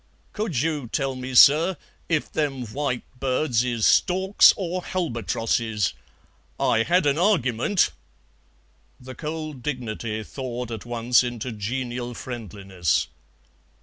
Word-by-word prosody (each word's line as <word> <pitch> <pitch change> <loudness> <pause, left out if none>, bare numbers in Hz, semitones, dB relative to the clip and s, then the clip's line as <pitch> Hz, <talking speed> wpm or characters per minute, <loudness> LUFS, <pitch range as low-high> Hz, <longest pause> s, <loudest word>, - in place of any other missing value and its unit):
"Could 210 - -1
you 150 -4 -1
tell 135 +2 -1
me, 130 0 -6
sir, 160 +7 +7 0.3
if 160 -3 0
them 135 -5 -2
white 125 +2 -3 0.2
birds 130 -2 +1
is 120 -3 0
storks 190 +2 +5
or 180 -1 -3
halbatrosses? 115 - -1 0.7
I 115 - +3
had 175 +7 +2
an 145 +2 +2
argyment 170 - +2 0.6
" - - -37 0.3
The 130 +1 -10
cold 155 -2 -6
dignity 115 -5 -4
thawed 125 -1 -6
at 115 +1 -7
once 120 +1 +3
into 120 0 -4
genial 120 +3 -4
friendliness. 100 - -2
125 Hz, 115 wpm, -24 LUFS, 115-150 Hz, 0.7 s, sir